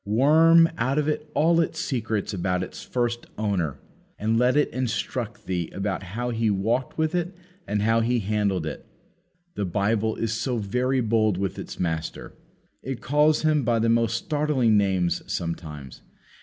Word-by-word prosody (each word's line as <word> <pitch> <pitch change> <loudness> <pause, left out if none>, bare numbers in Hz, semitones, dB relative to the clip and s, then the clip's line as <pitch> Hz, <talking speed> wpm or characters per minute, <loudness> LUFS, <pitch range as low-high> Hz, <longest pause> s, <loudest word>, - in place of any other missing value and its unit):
Worm 160 +9 +5
out 130 +4 +1
of 150 -1 +1
it 150 0 -2
all 165 +2 +4
its 165 - -2
secrets 110 -5 -2
about 90 -1 -1
its - - -8
first 120 -1 -2
Owner. 95 -9 -1 0.4
And 110 +2 +1
let 125 +3 +3
it 150 - +3
instruct 120 -3 -3
thee 90 -3 -2
about 95 -1 -2
how 115 +7 -4
He 115 -1 0
walked 110 +6 -1
with 160 +1 0
it 180 +1 -2 0.3
and 105 0 0
how 115 +1 +3
He 120 +2 +1
handled 100 -5 0
it. 80 - -6 0.7
The 105 - -3
Bible 105 +4 0
is 110 -1 -2
very 125 +2 0
bold 110 -4 +2
with 95 -1 -3
its - - -8
Master. 80 -2 -3 0.5
It 130 -1 -5
calls 150 +3 +2
Him 155 -1 +3
by 120 0 +2
the 115 +1 +1
most 115 0 +2
startling 145 -5 +1
names 95 -4 +1
sometimes. 75 -6 -5
115 Hz, 160 wpm, -25 LUFS, 100-130 Hz, 0.7 s, Worm